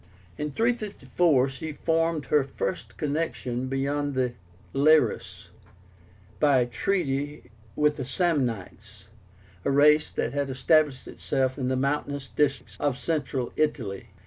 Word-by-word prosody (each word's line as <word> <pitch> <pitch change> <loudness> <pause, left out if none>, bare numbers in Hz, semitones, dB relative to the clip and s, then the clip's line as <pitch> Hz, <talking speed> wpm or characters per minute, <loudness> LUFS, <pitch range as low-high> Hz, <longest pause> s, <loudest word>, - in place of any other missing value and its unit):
In 150 - -3
354 185 - +1
she 150 +3 -6
formed 165 0 0
her 150 -2 +3
first 135 +6 -4
connections 140 -5 -2
beyond 140 +1 -1
the 125 -2 0 0.4
Liris, 140 -4 +2 0.9
by 140 -4 +4
a - - +2
treaty 140 - -2 0.2
with 150 0 +2
the 135 - -3
SAMNITES, 115 - -2 0.6
a - - 0
race 150 +2 +5
that - - -2
had 140 -1 -1
established 140 +1 +2
itself 130 +1 -1
in 130 - -1
the 130 - +1
mountainous 140 +1 -1
districts 145 -2 -1
of 140 -4 0
Central 135 -5 -2
Italy. 120 -11 -1
140 Hz, 120 wpm, -26 LUFS, 130-150 Hz, 0.9 s, race